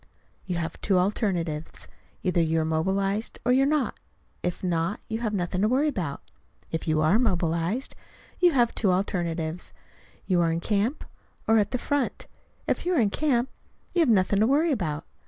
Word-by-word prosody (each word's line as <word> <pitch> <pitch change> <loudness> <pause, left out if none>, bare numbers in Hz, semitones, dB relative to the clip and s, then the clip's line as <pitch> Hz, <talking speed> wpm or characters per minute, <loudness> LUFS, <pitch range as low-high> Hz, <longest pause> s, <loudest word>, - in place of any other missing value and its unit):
You 180 - -1
have 165 -1 -4
two 195 -3 +2
alternatives: 180 -5 -1 0.4
either 180 -2 +2
you 165 0 +1
are 160 - 0
mobilized 195 +6 0
or 245 - +3
you 260 +2 +5
are - - +4
not. 300 -3 0 0.4
If 180 +1 -3
not, 170 +2 0
you 220 0 -3
have 225 -3 -1
nothing 180 -2 -1
to 210 - +4
worry 270 +6 +2
about. 175 - -4 0.5
If 160 +1 -3
you 155 -1 +2
are 160 +8 +4
mobilized, 180 +1 0 0.5
you 355 -1 +5
have 240 -3 +3
two 200 -5 +2
alternatives: 175 -3 -2 0.5
you 180 -3 +2
are 165 -1 +2
in 165 - -1
camp 210 - 0 0.4
or 220 0 +5
at 205 -1 +1
the 250 - -1
front. 285 +1 -1 0.4
If - - -1
you 360 0 +1
are - - +3
in 210 -4 +2
camp, 265 -3 +1 0.4
you 355 - +1
have 320 -6 +4
nothing 200 -2 +3
to 220 - +4
worry 305 +5 +3
about. 160 - -2
195 Hz, 185 wpm, -26 LUFS, 170-240 Hz, 0.5 s, you